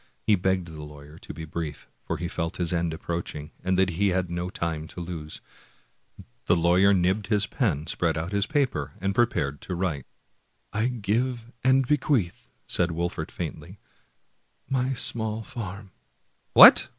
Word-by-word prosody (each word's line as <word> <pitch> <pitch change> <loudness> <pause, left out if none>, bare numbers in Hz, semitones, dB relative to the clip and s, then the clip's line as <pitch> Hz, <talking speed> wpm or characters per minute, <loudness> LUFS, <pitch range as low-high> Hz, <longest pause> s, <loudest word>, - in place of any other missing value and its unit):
He 110 - +4
begged 95 -2 +1
the 80 -1 -8
lawyer 75 +1 -12
to - - -9
be 80 - -7
brief, 80 -1 -5
for - - -3
he 85 - -3
felt 80 -2 -3
his 90 -1 +1
end 85 -1 0
approaching, 80 -2 -5
and 95 0 +1
that 95 -1 +3
he 100 +5 +1
had 90 -2 0
no 85 +1 -2
time 80 -4 -3
to - - -9
lose. 85 -3 -6 1.1
The 85 - +5
lawyer 90 +4 +4
nibbed 95 +2 +2
^ - - -21
his 105 -2 +3
pen, 85 - 0
spread 85 0 0
out 80 +4 -3
his 100 0 +1
paper, 75 - 0
and 95 +1 0
prepared 95 -12 +1
to 90 - -4
write. 85 -7 -2 0.4
" - - -40
I 110 +3 +1
give 120 +1 -1
and 130 0 +4
bequeath," 130 - +1 0.2
said 85 -1 +1
Wolfert 85 -1 -3
faintly, - - -6 0.5
" 65 +1 -43
my 130 0 0
small 110 -2 -2
farm 100 -3 -7 0.2
" - - -43
" - - -43
What! - - +10
90 Hz, 175 wpm, -26 LUFS, 80-105 Hz, 1.1 s, What